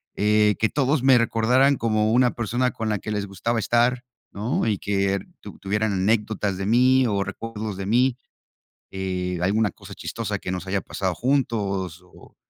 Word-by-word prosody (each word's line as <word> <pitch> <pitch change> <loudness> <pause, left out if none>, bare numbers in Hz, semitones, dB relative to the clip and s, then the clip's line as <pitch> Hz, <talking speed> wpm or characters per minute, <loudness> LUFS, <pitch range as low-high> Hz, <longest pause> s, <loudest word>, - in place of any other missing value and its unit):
eh, 105 0 +3
que 110 - +2
todos 140 0 +1
me 130 -1 +6
recordaran 125 +4 +3
como 110 -1 +1
una 125 0 +4
persona 120 +2 0
con 110 -1 -4
la 105 -2 0
que 105 - -8
les 105 -1 -2
gustaba 100 +4 -2
estar, 120 +2 +1 0.3
¿no? 110 +4 -1
Y 105 -2 +1
que 100 0 0 0.2
tu - - -11
tuvieran 105 +1 -1
anécdotas 105 0 0
de 95 +1 -3
mí 130 +2 +4
o 100 -3 0
recuerdos 110 -1 -6
de 95 0 -5
mí, 125 +3 +2 0.8
eh, 90 -2 -3
alguna 105 +1 +1
cosa - - -12
chistosa - - -4
que 90 - -5
nos 90 0 -5
haya 100 +1 0
pasado 95 -1 -3
juntos 100 - -1
o 90 - -19
110 Hz, 175 wpm, -23 LUFS, 100-120 Hz, 0.8 s, me